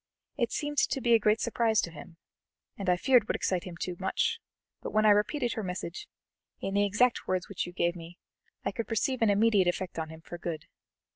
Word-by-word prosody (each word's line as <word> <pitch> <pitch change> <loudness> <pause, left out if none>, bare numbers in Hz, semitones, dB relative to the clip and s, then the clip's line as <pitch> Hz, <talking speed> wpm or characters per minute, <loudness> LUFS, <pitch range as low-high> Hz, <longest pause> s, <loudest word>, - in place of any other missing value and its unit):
It 235 -4 0
seemed 295 -1 -1
to 270 - +1
be 240 -2 +3
a 230 - +7
great 215 +1 +3
surprise 230 -2 +2
to 170 - -4
him, 165 +1 -12 0.6
and 195 -2 -3
I 180 - +4
feared 245 +2 +4
would - - 0
excite 185 -2 -1
him 175 -2 -8
too 180 +1 -4
much; 190 - 0 0.4
but - - -4
when 215 0 +2
I 210 - +8
repeated 235 +5 +1
her 220 - -3
message, 180 -2 -5 0.5
in 195 - -3
the 205 0 +3
exact 235 +5 +2
words 185 -1 -1
which 195 -3 -3
you - - -7
gave 175 -1 0
me, 170 +1 -10 0.5
I - - 0
could 230 -3 -4
perceive 235 +3 0
an 225 - +4
immediate 205 -2 +4
effect 175 -1 -2
on 160 -1 -3
him 160 0 -11
for 175 +1 -9
good. 165 -3 -4
200 Hz, 220 wpm, -29 LUFS, 175-230 Hz, 0.6 s, I